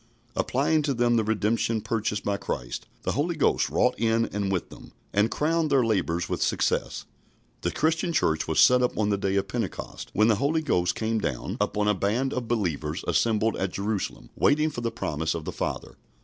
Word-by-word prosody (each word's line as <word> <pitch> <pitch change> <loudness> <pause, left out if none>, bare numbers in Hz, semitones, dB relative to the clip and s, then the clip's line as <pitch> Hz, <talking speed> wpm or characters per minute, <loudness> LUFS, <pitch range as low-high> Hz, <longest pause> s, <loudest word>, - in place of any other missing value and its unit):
Applying 150 +4 +1
to 140 -2 -1
them 120 0 +2
the 115 - +3
redemption 110 +1 0
purchased 105 -1 -2
by 100 - 0
Christ, - - -5 0.2
the - - 0
Holy 165 +4 0
Ghost 150 - +2
wrought - - +2
in 115 0 +2
and 100 -1 -1
with 95 -3 -2
them, - - -13 0.2
and 105 +3 +3
crowned 160 +1 +1
their 135 -4 +3
labours 90 -5 0
with - - -3
success. - - 0 0.6
The - - 0
Christian 160 +2 0
Church 80 - +1
was 80 - +1
set 125 0 +6
up 125 - 0
on 105 -1 +1
the 100 - +2
day 95 0 0
of 100 0 +1
Pentecost, 110 -2 -5
when 110 +2 +4
the 110 -3 +3
Holy 155 +5 +1
Ghost 90 - +1
came 110 0 -1
down 65 - -3
upon 105 0 0
a 105 - +4
band 110 +8 0
of 125 -2 -3
believers 85 -8 -2
assembled 110 -1 +2
at 95 -1 -2
Jerusalem 100 0 -3
waiting 155 +2 +3
for 120 - -5
the 115 - 0
promise 80 -5 -2
of 80 -2 -5
the - - -3
Father. - - -4
110 Hz, 200 wpm, -26 LUFS, 100-125 Hz, 0.6 s, set